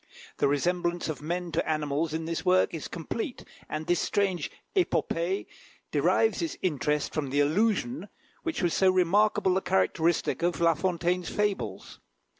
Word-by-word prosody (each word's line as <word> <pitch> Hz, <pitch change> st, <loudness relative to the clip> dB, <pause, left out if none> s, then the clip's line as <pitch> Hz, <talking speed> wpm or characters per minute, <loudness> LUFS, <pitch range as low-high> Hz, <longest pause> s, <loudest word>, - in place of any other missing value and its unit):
The -, -, +3 dB
resemblance 175 Hz, +4 st, 0 dB
of 155 Hz, -, -4 dB
men 175 Hz, +3 st, -3 dB
to -, -, -1 dB
animals 155 Hz, 0 st, 0 dB
in 160 Hz, +1 st, -3 dB
this 165 Hz, 0 st, -3 dB
work 185 Hz, 0 st, +3 dB
is 160 Hz, -, -4 dB
complete, 220 Hz, -, -5 dB, 0.3 s
and 155 Hz, +1 st, -3 dB
this 175 Hz, 0 st, +2 dB
strange 195 Hz, -3 st, 0 dB, 0.3 s
épopée 190 Hz, -, 0 dB, 0.5 s
derives 445 Hz, -, +2 dB
its 330 Hz, -, -3 dB
interest 150 Hz, -3 st, 0 dB
from 145 Hz, -3 st, -2 dB
the 140 Hz, +2 st, 0 dB
allusion, 215 Hz, -, +1 dB, 0.3 s
which 325 Hz, -, -3 dB
was 175 Hz, -, +2 dB
so 190 Hz, -, +4 dB
remarkable 185 Hz, +1 st, +3 dB
a -, -, 0 dB
characteristic 160 Hz, -, +1 dB
of 175 Hz, 0 st, 0 dB
La 170 Hz, -1 st, +4 dB
Fontaine's 175 Hz, +1 st, -1 dB
fables. 200 Hz, -, -2 dB
175 Hz, 150 wpm, -28 LUFS, 155-190 Hz, 0.5 s, so